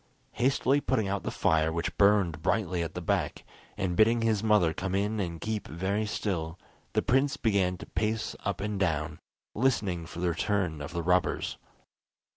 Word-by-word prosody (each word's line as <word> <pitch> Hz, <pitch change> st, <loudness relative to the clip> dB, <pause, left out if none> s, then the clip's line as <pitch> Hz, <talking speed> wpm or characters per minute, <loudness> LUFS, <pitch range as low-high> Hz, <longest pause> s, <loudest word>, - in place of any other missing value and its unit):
Hastily 135 Hz, +2 st, +2 dB
putting 110 Hz, -6 st, 0 dB
out 100 Hz, 0 st, -1 dB
the -, -, -3 dB
fire 80 Hz, 0 st, +2 dB
which 85 Hz, +1 st, -2 dB
burned 100 Hz, -6 st, +3 dB
brightly 90 Hz, -1 st, 0 dB
at 80 Hz, -2 st, -4 dB
the -, -, -4 dB
back, -, -, -1 dB, 0.3 s
and 90 Hz, -2 st, -1 dB
bidding 115 Hz, +3 st, +4 dB
his 110 Hz, -3 st, +2 dB
mother 105 Hz, -7 st, +3 dB
come 95 Hz, +1 st, -3 dB
in 105 Hz, +2 st, 0 dB
and 85 Hz, -4 st, -3 dB
keep 110 Hz, +1 st, -3 dB
very 95 Hz, +6 st, -1 dB
still, 90 Hz, -5 st, -2 dB, 0.4 s
the -, -, +2 dB
prince 135 Hz, +3 st, +2 dB
began 95 Hz, -5 st, +1 dB
to -, -, -9 dB
pace 110 Hz, +3 st, -2 dB
up -, -, -3 dB
and 105 Hz, -1 st, -2 dB
down, 80 Hz, -4 st, -1 dB, 0.3 s
listening 100 Hz, -9 st, 0 dB
for 85 Hz, -, -8 dB
the 90 Hz, 0 st, +1 dB
return 90 Hz, -3 st, -1 dB
of 70 Hz, -, -6 dB
the 85 Hz, -1 st, -3 dB
robbers. 90 Hz, +1 st, +1 dB
95 Hz, 175 wpm, -29 LUFS, 85-110 Hz, 0.4 s, bidding